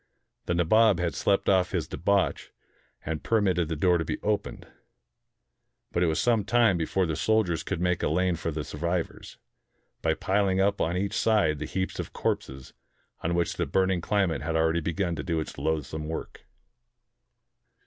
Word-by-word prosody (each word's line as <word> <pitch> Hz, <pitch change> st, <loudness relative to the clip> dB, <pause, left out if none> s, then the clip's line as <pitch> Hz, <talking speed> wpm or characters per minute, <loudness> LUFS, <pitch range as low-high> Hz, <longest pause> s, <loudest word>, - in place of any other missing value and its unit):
The 85 Hz, -, +1 dB
Nabob 100 Hz, +3 st, +4 dB
had 85 Hz, -2 st, -1 dB
slept 100 Hz, -1 st, +1 dB
off 95 Hz, -2 st, +3 dB
his -, -, -1 dB
debauch, 100 Hz, +2 st, 0 dB, 0.6 s
and 80 Hz, -1 st, -3 dB
per 115 Hz, -, +2 dB
mitted 90 Hz, -5 st, +1 dB
the 80 Hz, -, -2 dB
door 90 Hz, +3 st, +3 dB
to -, -, 0 dB
be -, -, -3 dB
opened. 105 Hz, -1 st, -2 dB, 1.3 s
But 85 Hz, -, 0 dB
it 90 Hz, -, +3 dB
was 80 Hz, -1 st, 0 dB
some 115 Hz, 0 st, +2 dB
time 115 Hz, -1 st, +3 dB
be 80 Hz, -, -1 dB
fore 95 Hz, -1 st, +1 dB
the 80 Hz, -2 st, -2 dB
soldiers 100 Hz, -7 st, +1 dB
could 90 Hz, +1 st, -3 dB
make 90 Hz, 0 st, 0 dB
a -, -, +1 dB
lane 90 Hz, -1 st, +1 dB
for 80 Hz, -, -3 dB
the 75 Hz, -1 st, -3 dB
survivors, 85 Hz, +3 st, -4 dB, 0.6 s
by -, -, +1 dB
piling 95 Hz, -1 st, +1 dB
up 100 Hz, +1 st, +2 dB
on 85 Hz, +2 st, 0 dB
each 100 Hz, +1 st, -2 dB
side 105 Hz, -10 st, +2 dB
the 75 Hz, -, -3 dB
heaps 95 Hz, +4 st, -3 dB
of -, -, -5 dB
corpses 65 Hz, -1 st, -3 dB, 0.5 s
on 85 Hz, +1 st, -1 dB
which 85 Hz, -1 st, 0 dB
the -, -, -1 dB
burning 95 Hz, -2 st, +1 dB
climate 95 Hz, -6 st, 0 dB
had 80 Hz, +2 st, -2 dB
already 80 Hz, +1 st, +2 dB
begun 85 Hz, +2 st, -1 dB
to 75 Hz, -, -4 dB
do 85 Hz, -2 st, -1 dB
its 80 Hz, -, -6 dB
loathsome 75 Hz, 0 st, -2 dB
work. 80 Hz, -, -7 dB
85 Hz, 180 wpm, -27 LUFS, 80-100 Hz, 1.3 s, Nabob